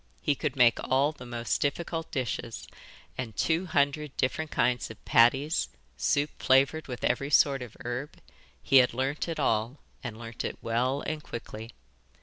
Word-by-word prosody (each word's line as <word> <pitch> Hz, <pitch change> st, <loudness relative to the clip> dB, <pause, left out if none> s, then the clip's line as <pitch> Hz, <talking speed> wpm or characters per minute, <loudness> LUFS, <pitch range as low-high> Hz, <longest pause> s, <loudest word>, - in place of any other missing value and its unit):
He 145 Hz, -, +1 dB
could 140 Hz, 0 st, -3 dB
make 120 Hz, -3 st, +5 dB
all 135 Hz, +3 st, +2 dB
the 125 Hz, -5 st, -11 dB
most 120 Hz, 0 st, -2 dB
difficult 165 Hz, +3 st, -2 dB
dishes, 120 Hz, -2 st, -4 dB, 0.5 s
and 115 Hz, -5 st, -4 dB
two 170 Hz, +3 st, +1 dB
hundred 145 Hz, -1 st, 0 dB
different 150 Hz, +4 st, 0 dB
kinds 125 Hz, -3 st, +1 dB
of 110 Hz, -, -12 dB
patties, 135 Hz, +4 st, +4 dB, 0.3 s
soup 145 Hz, -, +1 dB
flavoured 140 Hz, +4 st, +3 dB
with 125 Hz, -3 st, -6 dB
every 140 Hz, -1 st, +1 dB
sort 140 Hz, -2 st, +4 dB
of 120 Hz, -3 st, -9 dB
herb 125 Hz, +4 st, -4 dB, 0.5 s
he 135 Hz, -, +5 dB
had 125 Hz, -2 st, +5 dB
learnt 135 Hz, +5 st, -1 dB
it 165 Hz, -2 st, -3 dB
all, 115 Hz, 0 st, +1 dB, 0.3 s
and 115 Hz, -4 st, -5 dB
learnt 115 Hz, 0 st, -6 dB
it -, -, -4 dB
well 125 Hz, +5 st, 0 dB
and 155 Hz, -1 st, -3 dB
quickly. 115 Hz, -4 st, -8 dB
130 Hz, 160 wpm, -28 LUFS, 120-145 Hz, 0.5 s, make